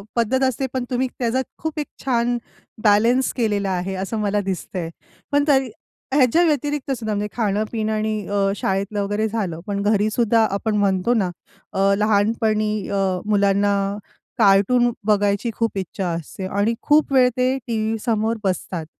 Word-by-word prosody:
पद्धत 245 +3 +1
असते. 260 +1 0
पण 260 - -1
तुम्ही 255 +1 0
त्याचा 250 +1 +1 0.2
खूप 315 -1 -4
एक 295 - -3 0.2
छान 240 -1 +1 0.5
बॅलेन्स 230 +5 +4
केलेला 205 -5 0
आहे, 185 +1 -2
असं 195 +4 -3
मला 205 0 0
दिसतंय. 185 -2 -4 0.4
पण 285 0 +3
तरी 265 -3 +3 0.4
ह्याच्या 285 +5 +4
व्यतिरिक्त 290 -2 -1
सुद्धा, 220 -2 -3
म्हणजे 205 0 -1
खाणं-पिणं 215 +1 -1
आणि 215 0 -1
अ, 200 -1 +1
शाळेतलं 200 +2 -1
वगैरे 205 +2 -1
झालं. 200 -7 -3
पण 200 0 -2
घरीसुद्धा 215 +2 +2
आपण 210 +2 -1
म्हणतो 200 +2 +2
ना 200 -6 +1 0.4
अ, 195 +1 +3
लहानपणी 215 0 +1 0.2
अ, 200 - -1 0.3
मुलांना 200 -1 +2 0.6
कार्टून 220 +4 +4 0.2
बघायची 205 +1 +2
खूप 230 -3 -1
इच्छा 190 0 -3
असते 170 +3 -5
आणि 205 +4 0
खूप 300 -1 +3
वेळ 255 -1 +6
ते 255 +1 +2
टी-व्हीसमोर 225 0 0
बसतात. 180 -3 -2
215 Hz, 145 wpm, -21 LUFS, 200-240 Hz, 0.6 s, वेळ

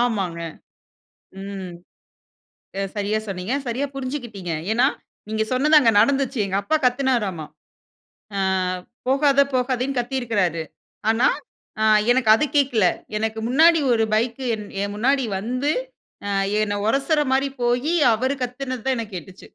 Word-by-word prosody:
ஆமாங்க. 195 -8 -1 1.0
ம். 195 -2 -6 1.1
ச 195 - -1
சரியா, 205 +1 0
சொன்னீங்க. 190 +5 -3
சரியா, 250 +4 -1
புரிஞ்சுக்கிட்டீங்க. 240 - -5 0.2
ஏன்னா, 245 +4 +4 0.4
நீங்க 220 0 0
சொன்னது 300 +4 +5
அங்கு 235 -5 +4
நடந்துச்சு 270 +1 +1
எங்க 195 0 -3
அப்பா 315 - 0
கத்துனாராமா. 245 - 0 0.9
ஆ - - 0 0.7
போகாத 280 +1 +4
போகாதன்னு 255 +1 0
கத்தியிருக்கிறாரு. 225 - -1 0.5
ஆனா, 225 +3 +4 0.5
ஆ - - +3 0.3
எனக்கு 245 -3 +2
அது 300 - +1
கேட்கல. 250 -8 +3 0.3
எனக்கு 220 +1 -2
முன்னாடி 320 +6 +5
ஒரு 225 - +2
பைக் 235 +3 -1
என் 210 -2 -5 0.2
என் 200 0 -3
முன்னாடி 265 +5 +2 0.2
வந்து 255 +7 -1 0.6
ஆ - - -2 0.3
என்னை 205 -1 0
ஒரசுற 280 +5 +2
மாரி 270 +1 +2 0.2
போயி 245 +7 +1 0.2
அவரு 260 +5 0
கத்துனதுதான் 255 0 -3
எனக்கு 210 -4 -6
கேட்டுச்சு. 180 +3 -11
245 Hz, 125 wpm, -22 LUFS, 210-270 Hz, 1.1 s, சொன்னது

